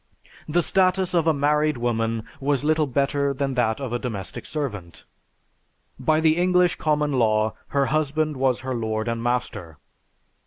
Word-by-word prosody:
The 175 +3 +2
status 185 0 +2
of 165 -2 +2
a - - +6
married 150 0 +1
woman 115 -2 -1 0.2
was 140 -1 0
little 155 0 +2
better 140 +1 0
than 135 0 -1
that 120 -2 0
of 130 -4 -4
a 120 - -1
domestic 105 -7 -5
servant. 105 - -5 1.0
By 155 +4 +2
the 160 0 +3
English 180 0 +3
Common 150 -1 0
Law 110 -4 +2
her 140 -1 +1
husband 155 +1 0
was 130 -2 +1
her 130 0 -3
lord 110 -1 -2
and 115 0 -2
master. 120 -10 -3
140 Hz, 155 wpm, -23 LUFS, 120-155 Hz, 1.0 s, a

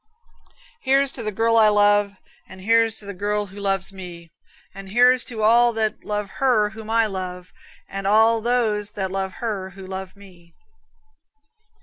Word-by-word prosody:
Here's 275 0 +2
to 260 - -7
the 215 -1 -3
girl 230 +2 +1
I 220 -1 +6
love, 205 -1 +3 0.4
And 190 - -12
here's 225 +2 +2
to 205 - -5
the 200 - -6
girl 205 +2 -2
who 200 +1 -12
loves 195 -1 -1
me, 175 -3 -10 0.4
And 195 0 -10
here's 250 +4 +4
to 220 -3 -5
all 235 +2 +4
that 220 -1 -2
love 210 -1 -4
her 220 -6 +3
whom 220 0 -10
I 225 0 +3
love, 185 -3 -6 0.3
And 195 0 -5
all 220 +2 +4
those 215 -3 0
that 190 -3 -3
love 190 -1 -3
her 205 -5 -4
who 190 - -9
love 190 0 -7
me. 180 -4 -18
210 Hz, 165 wpm, -22 LUFS, 195-225 Hz, 0.4 s, I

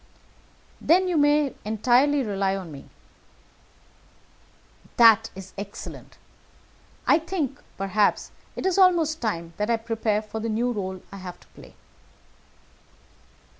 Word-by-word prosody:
"Then 370 +3 +4
you 360 - 0
may 290 -1 +3
entirely 250 +7 +2
rely 195 -3 -1
on 185 -4 -7
me." 140 - -10 2.1
"That 225 -1 +6
is 190 0 -10
excellent. 200 0 -9 0.9
I - - +5
think, 315 -5 -3 0.2
perhaps, 195 +2 +1 0.2
it - - -5
is 380 0 +2
almost 335 -4 +3
time 170 -7 -3
that 210 +2 -1
I 230 - +3
prepared 220 -1 -1
for 220 +1 -6
the 225 +1 -3
new 240 +3 0
rôle 190 -3 -5
I 195 - -8
have 180 -2 -9
to - - -21
play." - - -16
225 Hz, 125 wpm, -25 LUFS, 200-290 Hz, 2.1 s, That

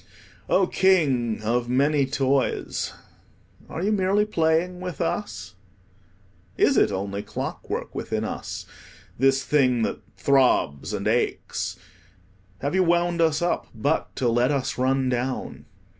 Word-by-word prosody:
Oh, 190 - +4
King 135 - +2
of 120 +2 0
many 140 +2 +2
toys, 135 -1 0 0.8
are 165 - -4
you 205 - +1
merely 200 +1 +2
playing 175 -2 +1
with 180 -5 -6
us? 95 - -3 1.0
Is - - +4
it - - +4
only 100 +1 -3
clockwork - - -5
within - - -3
us, - - -5 0.5
this 135 +1 +3
thing 130 -5 +2
that - - -2 0.2
throbs 130 - +2
and - - -2
aches? - - -1 0.9
Have 140 +3 -1
you 190 - +3
wound 175 0 +2
us 160 0 +2
up 175 - 0
but 140 +8 -1
to 125 - 0
let 120 +2 +2
us 140 -3 -1
run 130 +1 +2
down? 125 +1 -3
140 Hz, 130 wpm, -24 LUFS, 125-175 Hz, 1.0 s, Oh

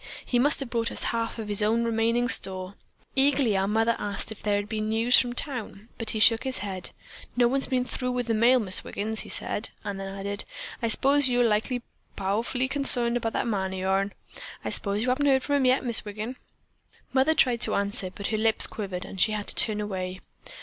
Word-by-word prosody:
He 245 - 0
must 290 +4 +4
have 260 -3 -6
brought 230 -1 -1
us - - -2
half 230 0 -2
of 220 -2 -6
his 205 0 +3
own 225 +3 +1
remaining 230 +1 0
store. 185 -4 +2 0.4
Eagerly 270 -5 +2
our 195 0 +1
mother 225 +2 +1
asked 205 +1 -4
if 220 - -9
there 205 -1 0
had 205 0 -2
been 215 0 -3
news 230 +3 +4
from 245 -1 -1
town, 235 -6 -4
but 225 -2 -2
he 220 - -2
shook 225 +1 +4
his 265 -1 -3
head. 190 -2 -3 0.5
'No 240 -1 +4
one's 270 +2 +1
been 255 -2 0
through 250 0 -4
with 245 -1 -2
the 230 - -1
mail, 235 +4 +4
Mis' 190 -5 +5
Wiggin,' 215 +2 -4
he - - 0
said; 210 - -1
then 200 -2 -5
he - - -5
added: 200 +1 -3 0.4
'I 230 - 0
s'pose 275 +4 +4
likely 245 0 +1
you're 245 - -5 0.3
powerful 225 +6 -1
consarned 260 -4 +3
about 225 -2 -3
that - - -1
man 190 -4 -2
o' - - -5
yourn. 195 +1 -1 0.5
I - - -2
s'pose 205 +1 0
you 250 - -1
haven't 285 +3 +1
heard 265 -1 +3
from 285 -1 0
him 270 - +1
yet, 255 +1 +2
Mis' 235 -2 +7
Wiggin?' 215 +4 -6 0.8
"Mother 270 +4 +3
tried 245 -5 +2
to - - +1
answer, 200 -2 -2
but 200 +2 -9
her 220 - -1
lips 220 0 +3
quivered 190 -4 -4
and 190 - -5
she 215 - +4
had 210 -1 -3
to - - -2
turn 215 -2 +1
away. 185 -3 -4
225 Hz, 220 wpm, -26 LUFS, 205-250 Hz, 0.8 s, Mis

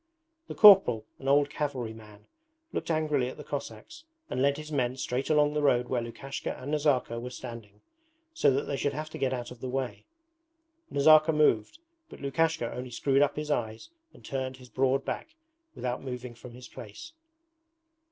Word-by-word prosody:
The - - -7
corporal, 190 - +8
an 135 - -7
old 145 +1 +4
cavalry 130 -7 -3
man, 105 -2 -15 0.5
looked - - -3
angrily 150 -5 +1
at - - -10
the - - -8
Cossacks 310 - -7 0.3
and 130 - -1
led 140 +1 +3
his 155 0 -8
men 130 -3 0
straight 130 0 -2
along 150 -1 +3
the 150 - 0
road 125 -4 +2
where 125 -2 0
Lukashka 135 +4 -6
and 135 +3 -6
Nazarka 140 -6 +1
were 125 +1 -6
standing, 115 -5 -9 0.5
so 325 - +3
that 135 +1 +1
they 140 - -3
should 145 +1 -1
have 155 +2 -5
to - - -7
get 135 - +1
out 125 -2 -4
of 125 - -11
the 130 - -4
way. 130 -1 -3 0.9
Nazarka 155 +2 +6
moved, 150 - +2 0.3
but - - -12
Lukashka 150 -1 0
only 125 0 -6
screwed 135 +3 +1
up 145 0 +2
his 150 0 -3
eyes 110 -4 -2 0.2
and - - -17
turned 130 -1 -3
his 125 -1 -15
broad 135 +1 +1
back 315 0 -5 0.4
without 125 0 -3
moving 125 -2 -6
from 120 +1 -12
his 125 +1 -11
place. 335 -1 -10
135 Hz, 180 wpm, -29 LUFS, 125-150 Hz, 0.9 s, corporal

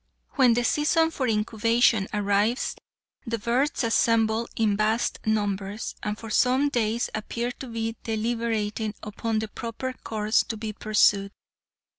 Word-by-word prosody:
When 255 -4 +4
the 245 - +1
season 320 +5 +2
for 265 -5 -2
incubation 225 0 +2
arrives, 205 +3 +1 0.5
the 230 0 -1
birds 245 +6 0
assemble 230 0 +2
in 215 -3 +2
vast 215 +2 0
numbers, 205 -1 -1
and 210 0 -3
for 225 -1 -8
some 260 +6 +3
days 235 -2 0
appear 235 +3 -3
to 260 +1 -9
be 225 -1 -3
deliberating 220 -1 -2
upon 220 +1 -2
the 220 0 -1
proper 235 +4 -5
course 215 -2 0
to 225 - -5
be 215 0 -5
pursued. 205 -2 +2
225 Hz, 135 wpm, -26 LUFS, 215-235 Hz, 0.5 s, When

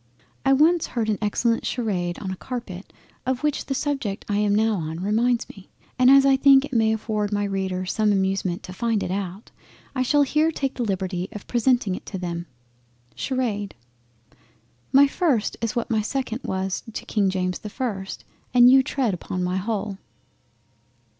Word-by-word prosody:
I 270 - +4
once 315 +4 +4
heard 225 -3 -2
an 210 - 0
excellent 230 +2 +1
Sharade 185 -8 -2
on 190 -2 -5
a - - -3
Carpet, 205 -4 -7 0.3
of 260 +1 -2
which 300 -1 -1
the 270 - -1
subject 270 -9 -2
I 205 - 0
am 205 -1 +2
now 220 +1 +3
on 160 -3 -4
reminds 230 +5 +1
me, 195 -2 -14 0.3
and 255 0 +6
as 275 0 +7
I 270 -1 +5
think 275 0 +6
it 270 - -11
may 225 -2 +3
afford 215 -1 -2
my 205 0 0
Readers 190 -2 -2
some 215 -1 +2
amusement 190 -2 0
to 185 - -8
find 225 0 0
it - - -3
out, 195 +1 -5 0.4
I 260 - -1
shall 290 +3 +3
here 305 +3 +2
take 275 -4 -2
the 245 - -3
liberty 190 -3 -2
of 210 - -8
presenting 240 -4 +1
it - - -7
to 195 - -5
them. 170 -1 -4 0.7
SHARADE 225 -7 -2 1.2
My 275 +1 +7
first 280 - 0
is 230 +1 -2
what 240 0 -2
my 220 -1 +2
second 250 +1 -3
was 190 0 -2
to - - -6
King 200 -3 +1
James 185 -1 -1
the 210 - -7
1st, 200 -5 -4 0.3
and 245 0 +8
you 265 0 +7
tread 245 -9 -1
on 180 0 -1
my 180 +1 -1
whole. 200 0 -3
215 Hz, 180 wpm, -24 LUFS, 190-255 Hz, 1.2 s, and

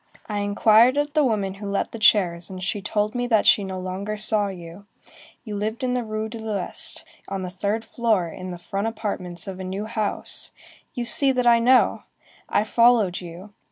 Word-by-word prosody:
I 210 -1 -3
inquired 215 +5 +4
of 290 0 0
the 305 -1 +3
woman 205 -7 0
who 200 +1 -7
let 200 - -1
the 230 - -7
chairs, 180 -5 +3
and 185 -1 -7
she 200 +2 -2
told 210 +2 -1
me 245 -1 -2
that 220 -3 +2
she 205 - +5
no 190 -1 -5
longer 190 +3 -4
saw 210 -1 +1
you. 180 +1 -10 0.6
You 215 -3 -6
lived 215 +4 -3
in 250 -1 0
the 250 -1 -1
Rue 215 0 -4
de 230 +1 -8
l'Ouest, 210 -5 -4 0.2
on 195 -1 -4
the 180 - -4
third 205 +4 -2
floor, 220 -6 0
in 185 +3 -8
the 175 - -6
front 195 +4 -3
apartments 195 -5 -4
of 190 -1 -6
a - - -5
new 190 +3 -4
house,—you 220 +3 -4
see 270 +3 +6
that 250 -1 0
I 235 -1 +6
know! 250 +2 +4 0.5
I - - +2
followed 225 -5 +3
you. 180 +4 -10
210 Hz, 195 wpm, -23 LUFS, 190-230 Hz, 0.6 s, see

